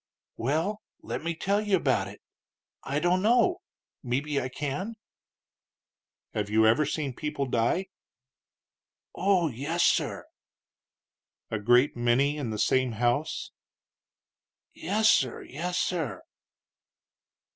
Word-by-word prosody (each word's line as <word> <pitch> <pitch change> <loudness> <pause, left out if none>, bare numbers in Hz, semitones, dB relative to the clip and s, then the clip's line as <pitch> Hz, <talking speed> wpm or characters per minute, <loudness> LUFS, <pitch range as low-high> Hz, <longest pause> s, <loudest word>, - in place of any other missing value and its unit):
"Well, 160 - -1 0.2
let - - -4
me 170 0 -2
tell 200 +5 0
you 205 -2 +2
about 135 -7 +1
it; - - -12 0.6
I 140 - -2
don't 175 +3 +2
know; 240 - +3 0.4
mebbe 140 +3 -1
I 130 - -3
can." 145 - -4 1.4
"Have 105 -1 -2
you 110 +1 +4
ever 125 +7 +4
seen 145 -3 -2
people 150 +1 -3
die?" 120 +9 +1 1.3
"Oh, 185 -4 +2
yes, 145 +8 -1
sir!" - - +1 1.3
"A 110 - -1
great 120 +6 +4
many 120 +5 +2
in 145 -6 -3
the 110 - -3
same 130 +2 +2
house?" 120 +7 -1 1.2
"Yes, 210 +6 +1
sir; 130 - +3
yes, 175 +5 -4
sir." 145 - -2
145 Hz, 115 wpm, -28 LUFS, 120-175 Hz, 1.4 s, you